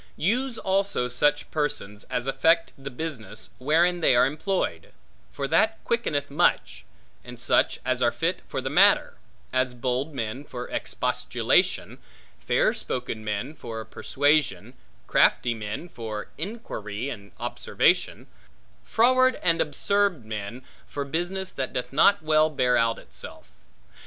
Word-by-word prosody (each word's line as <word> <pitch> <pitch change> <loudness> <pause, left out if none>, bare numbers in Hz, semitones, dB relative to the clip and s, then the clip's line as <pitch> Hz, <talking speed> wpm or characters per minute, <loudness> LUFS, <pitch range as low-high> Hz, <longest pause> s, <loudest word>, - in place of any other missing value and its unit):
Use 240 - 0
also 195 -9 0
such 145 +4 +1
persons 140 -9 -2
as 125 - -3
affect 160 +5 +2
the 135 0 -8
business, 125 -6 -6
wherein 170 +6 +2
they 130 - +5
are 125 - +6
employed; 145 - -2 0.4
for 135 - -3
that 220 +9 +3
quickeneth 145 - -1
much; 170 +5 +1 0.4
and - - -10
such, - - +2
as - - 0
are - - +4
fit - - -1
for - - -3
the - - -3
matter; - - +4 0.4
as 130 -1 +1
bold 130 +5 -2
men 115 +3 -3
for 125 -4 -7
expostulation, - - 0 0.4
fair - - +2
spoken 120 -3 -4
men 105 +7 -3
for 115 -6 -7
persuasion, 145 -1 0 0.3
crafty 120 - +3
men 110 +8 -5
for 110 -9 -6
inquiry 140 - -5
and 100 -4 -9
observation, - - +1 0.6
froward, 255 +3 +4
and 165 -2 +3
absurd 180 - +1
men, 110 +3 -6 0.2
for 140 -1 -4
business 175 +6 -2
that 130 -1 -4
doth 125 +1 -4
not 155 +4 +5
well 155 0 +4
bear 125 -5 +2
out 115 -1 +2
itself. - - -10
140 Hz, 130 wpm, -26 LUFS, 120-170 Hz, 0.6 s, are